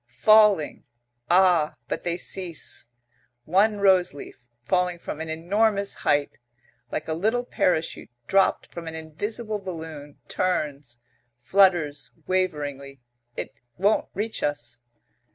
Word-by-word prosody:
Falling. 210 -7 +5 0.4
Ah, 175 -4 +4
but - - -3
they 170 0 -1
cease. 175 -9 -4 0.6
One 205 +6 +3
rose 190 -5 +4
leaf, 140 - -10 0.2
falling 180 +4 +1
from 160 -2 -6
an 160 - -5
enormous 200 +5 +1
height, 145 -2 0 0.5
like 155 - -4
a 160 - -1
little 220 +9 0
parachute 165 -8 0 0.2
dropped 195 +8 +2
from 170 -1 -8
an 160 - -5
invisible 210 +8 -4
balloon, 160 -6 -8
turns, 145 -8 -2 0.5
flutters 175 -4 +3 0.2
waveringly. 145 -7 -2 0.4
It - - -5 0.2
won't 205 +4 +2
reach 220 +2 -2
us. 120 -5 -3
175 Hz, 115 wpm, -25 LUFS, 150-195 Hz, 0.6 s, Falling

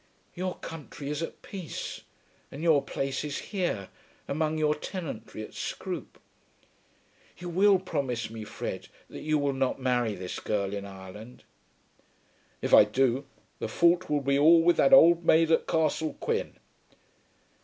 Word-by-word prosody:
"Your 185 0 -3
country 150 -2 -7
is 150 +1 -3
at 165 - -6
peace, 185 -5 -6 0.5
and 145 +4 -7
your 160 -4 +4
place 135 0 -3
is 145 -1 -3 0.2
here, 175 - -1 0.4
among 155 +2 -1
your 150 -1 +2
tenantry, 150 - -6
at - - -11
Scroope. - - -6 1.2
You 175 0 -7
will 195 +3 +5
promise 140 - -3
me, 110 0 -8
Fred, 105 - -6 0.2
that - - -8
you 155 0 +1
will 145 -1 0
not 135 -1 -1
marry 125 -4 0
this 90 -1 -6
girl 100 -2 -2
in 100 -1 -4
Ireland?" 100 +4 -11 1.2
"If - - -1
I - - +10
do, 130 +5 0 0.3
the - - -2
fault 175 +1 +3
will 150 -1 +1
be 140 +1 +1
all 165 +3 +7
with 175 +1 +4
that 275 - +4
old 170 -9 +7
maid 165 0 +4
at 160 - +2
Castle 160 -1 0
Quin." - - -2
145 Hz, 150 wpm, -28 LUFS, 125-165 Hz, 1.2 s, I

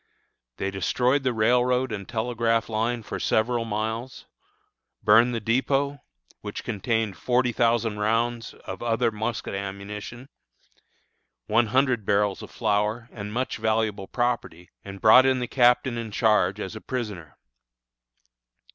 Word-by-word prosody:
They 95 - -2
destroyed 125 +8 +1
the 130 -1 0
railroad 125 +3 +2
and 100 -3 -6
telegraph 115 -1 0
line 115 +2 -1
for - - -5
several 115 +1 +1
miles, 110 +3 -4 0.8
burned 115 +3 +5
the - - -1
dépôt, 135 +5 0 0.4
which - - -6
contained 110 -2 -1
forty 125 +2 +1
thousand 115 -2 +1
rounds 115 +2 -1
of - - -7
other 115 0 +1
musket 110 +2 -4
ammunition, 100 +5 -6 1.2
one 115 - +2
hundred 130 -1 +2
barrels 100 0 +1
of - - -9
flour, 110 +2 -1
and 105 -2 -7
much 125 +4 -2
valuable 110 -3 -1
property, 115 -8 -2
and 100 -1 -9
brought 125 +4 +7
in 130 -1 +3
the 125 -1 -2
Captain 125 -1 +3
in 115 -1 -5
charge 105 -2 +2
as 100 +1 -5
a 110 - -8
prisoner. 105 - -5
115 Hz, 130 wpm, -25 LUFS, 105-120 Hz, 1.2 s, brought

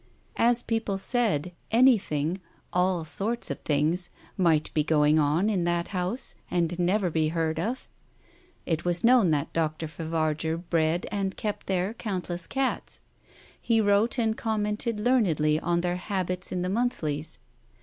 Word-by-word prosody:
As 240 +1 +4
people 225 -4 -1
said, 195 - +1 0.2
anything 195 - +3
— - - -36
all 180 -1 +1
sorts 220 +9 0
of - - -4
things 155 +5 0
— - - -26
might 165 -5 +2
be 155 - +2
going 150 0 +3
on 155 +7 +2
in 195 -5 +1
that 175 0 0
house 190 +6 0 0.2
and 175 0 -1
never 180 +1 +1
be 155 -1 +1
heard 160 0 -1
of. 235 +9 -3 0.8
It 165 -1 -1
was 175 -1 +1
known 235 -6 +5
that 150 0 -1
Dr. 160 -1 -1
Favarger 160 0 -2
bred 170 0 0
and 195 -2 -2
kept 210 -1 -4
there 190 +2 0
countless 180 -6 -4
cats; 270 -1 -2 0.6
he 230 -1 +2
wrote 205 +3 +2
and 225 -2 +1
commented 215 0 -2
learnedly 175 - +2
on 170 +1 0
their 180 0 -1
habits 185 -1 -3
in 180 -1 -2
the 180 - -1
monthlies. 160 -9 -2
180 Hz, 150 wpm, -27 LUFS, 160-210 Hz, 0.8 s, known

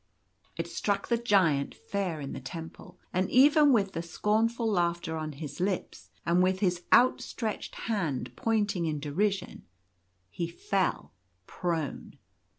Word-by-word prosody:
It 165 - -2
struck 200 +3 -1
the 235 - +3
Giant 185 -11 +2
fair 190 -6 -3
in 140 - -5
the - - -5
temple; 165 +6 -9 0.2
and 185 +1 +1
even 290 +3 +6
with 200 -6 +3
the 165 - -3
scornful 220 +7 0
laughter 175 -4 0
on 155 -1 -4
his 145 +1 -7
lips, 185 0 -2 0.2
and 170 +1 +3
with 185 +1 +2
his 180 -3 +1
outstretched 240 -3 +2
hand 170 - -2
pointing 205 -6 0
in 150 -2 -2
derision, 190 +7 -1 0.7
he 170 - -3
fell 185 +2 -1 0.3
prone. 165 - -3
185 Hz, 135 wpm, -29 LUFS, 165-210 Hz, 0.7 s, even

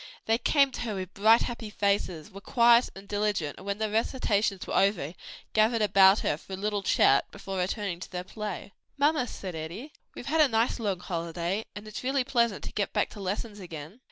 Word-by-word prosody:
They 225 +1 +2
came 275 +2 +3
to - - -6
her 225 -4 -3
with 185 -2 -6
bright, 220 +3 +5
happy 235 -3 -5
faces, 200 -4 -1
were 195 +1 -10
quiet 235 +2 +4
and 195 +1 -11
diligent 205 -7 -1
and 195 - -11
when 200 0 -1
the 220 0 -1
recitations 215 -4 0
were - - -5
over, 195 -6 +2 0.4
gathered 220 +1 +3
about 195 0 +6
her 150 - 0
for 190 - -11
a - - -3
little 205 +1 -1
chat 140 -7 +3
before 195 -1 -6
returning 180 -1 -2
to - - -8
their 180 -1 -4
play. 205 0 -6 0.3
"Mamma," 290 -2 +2
said 190 -5 -7
Eddie, 170 - -7 0.2
"we've - - -8
had 315 +2 +2
a 300 - +6
nice 230 0 +1
long 200 -5 -2
holiday, 170 +4 -3
and 210 +1 -8
it's 215 - -7
really 265 +1 +1
pleasant 235 -5 +1
to - - -6
get 205 - -2
back - - 0
to - - -10
lessons 205 +2 -4
again." 170 - -9
205 Hz, 210 wpm, -28 LUFS, 185-230 Hz, 0.4 s, about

